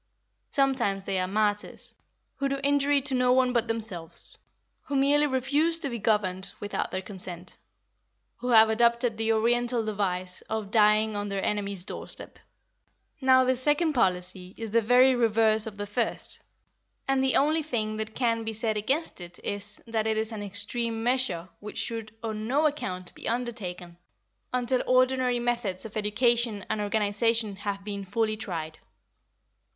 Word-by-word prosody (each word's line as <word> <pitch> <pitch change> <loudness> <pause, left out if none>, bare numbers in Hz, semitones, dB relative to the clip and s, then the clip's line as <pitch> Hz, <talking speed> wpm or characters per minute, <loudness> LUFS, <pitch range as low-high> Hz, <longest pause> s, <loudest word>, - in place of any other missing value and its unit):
Sometimes 260 -9 +1
they 190 -1 -1
are 185 - -1
martyrs, 210 +1 -2 0.4
who 275 0 -1
do 275 0 -2
injury 285 0 +2
to 275 0 0
no 250 -1 +3
one 255 -1 +3
but 235 -1 +1
themselves; 210 -8 0 0.5
who 285 - -4
merely 290 +2 +4
refuse 285 +5 +2
to 285 - +6
be 235 - -4
governed 195 -3 0
without 205 0 -3
their 185 0 -4
consent; 180 -2 -3 0.8
who 245 - -6
have 225 -2 +7
adopted 235 +1 +2
the 225 +1 0
Oriental 235 +1 +1
device 185 -4 -2
of 215 -2 -3
dying 215 0 +3
on 205 0 -3
their 195 -1 -2
enemy's 200 -3 -2
doorstep. - - -4 0.8
Now 260 0 +5
this 255 0 +1
second 300 +3 +2
policy 180 -4 -1
is 225 -2 -6
the 230 +1 +3
very 250 +4 +5
reverse 220 -2 +3
of 210 -2 -8
the 205 - -4
first, 215 +3 +1 0.7
and 270 -1 +2
the 265 - +3
only 310 +3 +3
thing 220 -8 -3
that 220 0 -5
can 230 -3 0
be 225 0 -4
said 215 0 -1
against 265 - -1
it 175 0 -9
is, 205 +1 -4
that 225 -1 -1
it 220 0 0
is 220 +1 -1
an 215 -2 -6
extreme 225 +3 0
measure 245 -9 +1
which 210 0 -9
should 225 -2 -3
on 215 -1 -4
no 285 +5 +2
account 185 -12 -2
be - - -5
undertaken, 200 -8 -4 0.5
until 250 0 0
ordinary 255 -1 +3
methods 235 -5 -2
of 220 - -9
education 220 0 0
and 215 - -1
organisation 210 +1 +1
have 200 -1 -4
been 200 -1 -5
fully 215 +3 -1
tried. 165 -7 -6
220 Hz, 160 wpm, -27 LUFS, 205-250 Hz, 0.8 s, have